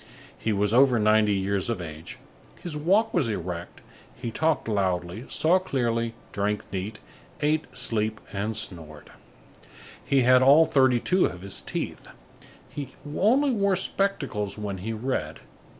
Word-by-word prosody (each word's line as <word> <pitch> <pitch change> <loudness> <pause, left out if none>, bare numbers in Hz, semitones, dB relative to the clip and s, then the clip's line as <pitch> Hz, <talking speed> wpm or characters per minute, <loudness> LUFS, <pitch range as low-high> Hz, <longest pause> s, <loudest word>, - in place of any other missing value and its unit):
He 110 - -2
was 105 +1 +1
over 130 0 +5
ninety 105 -1 +3
years 100 +2 0
of 115 - -1
age, 80 -2 -8 0.4
his 170 -4 -6
walk 195 +9 +2
was 150 -10 +1
erect, 90 -4 -5 0.3
he 115 - -5
talked 160 +3 0
loudly, 95 0 -1
saw 175 +4 +3
clearly, 115 -9 -1 0.2
drank 105 +1 -1
neat, 100 +3 -4 0.4
ate, 155 +1 +1
slept, 110 -1 +1 0.2
and 105 +2 -2
snored. 80 -7 -6 0.9
He 135 -1 +2
had 125 +1 +6
all 145 +5 +7
thirty 130 -5 +3
two 185 +8 +2
of 90 - -8
his 100 - -5
teeth. - - -5 0.6
He 145 -2 -8 0.2
only 265 +8 +3
wore 200 -4 +2
spectacles 140 - -1
when 100 -3 -4
he 110 +5 -4
read. 125 +4 -3
115 Hz, 140 wpm, -26 LUFS, 100-150 Hz, 0.9 s, all